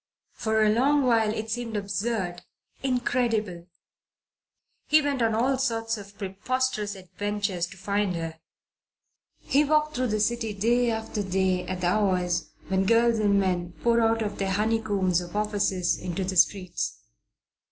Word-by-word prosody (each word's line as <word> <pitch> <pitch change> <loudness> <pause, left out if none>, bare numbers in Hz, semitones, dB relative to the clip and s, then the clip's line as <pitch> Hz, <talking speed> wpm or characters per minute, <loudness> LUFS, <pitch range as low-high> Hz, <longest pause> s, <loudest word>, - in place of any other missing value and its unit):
For 220 -1 +1
a 215 - +4
long 275 +6 +3
while 225 -3 +3
it 220 0 -4
seemed 230 -2 -3
absurd, 200 -3 -2 0.4
incredible. 235 -8 -1 1.2
He 310 - +6
went 285 -3 -1
on 225 -1 +2
all 260 +4 +1
sorts 225 -3 0
of 200 -1 -11
preposterous 210 +2 -2
adventures 200 -1 -3
to 190 - -13
find 200 0 -1
her. 165 -1 -5 1.0
He 285 +2 +3
walked 305 +1 +2
through 255 0 0
the 215 -1 -1
city 225 0 0
day 235 +4 +2
after 220 -1 -3
day 190 -1 0
at 185 0 -4
the 175 - +1
hours 180 -4 +1 0.2
when 190 0 +1
girls 230 0 +4
and 200 -2 +3
men 180 -3 -1
pour 235 0 +3
out 225 0 +2
of 205 -1 -5
their 195 -1 0
honeycombs 205 -4 +1
of 175 +2 -9
offices 205 -4 0
into 180 +1 -3
the 185 +1 -3
streets. 180 - +1
210 Hz, 150 wpm, -26 LUFS, 190-230 Hz, 1.2 s, He